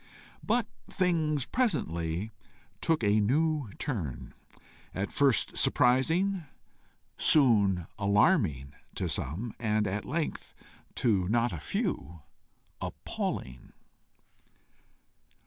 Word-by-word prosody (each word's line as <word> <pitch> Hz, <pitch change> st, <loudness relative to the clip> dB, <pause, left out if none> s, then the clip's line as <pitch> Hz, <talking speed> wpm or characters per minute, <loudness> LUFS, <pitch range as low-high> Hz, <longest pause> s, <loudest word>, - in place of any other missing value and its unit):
But 230 Hz, +1 st, +1 dB, 0.2 s
things 160 Hz, -7 st, 0 dB
presently 95 Hz, -, -1 dB, 0.5 s
took 160 Hz, -7 st, +1 dB
a 105 Hz, +1 st, +3 dB
new 145 Hz, +4 st, +1 dB
turn, 75 Hz, -, -4 dB, 0.6 s
at 100 Hz, +2 st, -2 dB
first 140 Hz, -5 st, +2 dB
surprising, 165 Hz, +10 st, +3 dB, 0.7 s
soon 100 Hz, -, +4 dB
alarming 100 Hz, -, +2 dB, 0.2 s
to -, -, -2 dB
some, 100 Hz, -, -3 dB
and 110 Hz, -2 st, +1 dB
at 100 Hz, +2 st, -2 dB
length, 160 Hz, +3 st, -4 dB, 0.4 s
to 95 Hz, -6 st, +1 dB
not 120 Hz, 0 st, +1 dB
a 80 Hz, -, -5 dB
few, 80 Hz, +2 st, -3 dB, 0.6 s
appalling. 65 Hz, 0 st, -5 dB
110 Hz, 85 wpm, -29 LUFS, 90-155 Hz, 0.7 s, soon